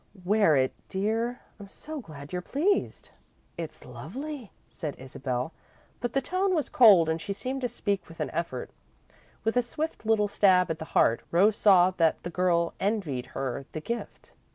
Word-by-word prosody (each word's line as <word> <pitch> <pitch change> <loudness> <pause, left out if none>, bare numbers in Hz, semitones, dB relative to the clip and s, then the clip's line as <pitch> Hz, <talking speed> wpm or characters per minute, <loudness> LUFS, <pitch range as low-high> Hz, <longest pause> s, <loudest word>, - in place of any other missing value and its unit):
"Wear 200 -5 +4
it, 130 -1 +2 0.2
dear. 225 +5 -1 0.2
I'm 200 - -9
so 305 +9 -8
glad 145 - -11
you're 180 - -1
pleased!" 335 - 0 0.5
"It's - - -7
lovely," 280 -5 -7 0.2
said 150 -4 -6
Isabel, 130 +1 -4 0.5
but 240 -1 -3
the 275 - +2
tone 370 +5 0
was 310 - -1
cold 200 -9 +7
and 160 0 -1
she 200 - -3
seemed 260 +6 -4
to 245 - -1
speak 200 -6 -2
with 165 - -13
an 150 -4 -2
effort. 160 -6 -4 0.7
With 225 +2 0
a 250 - +5
swift 300 +7 -4
little 220 -2 +2
stab 190 -4 +4
at 160 - -4
the 160 - -5
heart, 115 - +4
Rose 195 +6 +4
saw 185 -3 +6
that 165 -2 +2
the 175 - -5
girl 170 -1 +1
envied 190 - -1
her 135 0 -3
the 155 - -3
gift. 235 +9 -6
195 Hz, 175 wpm, -28 LUFS, 160-235 Hz, 0.7 s, cold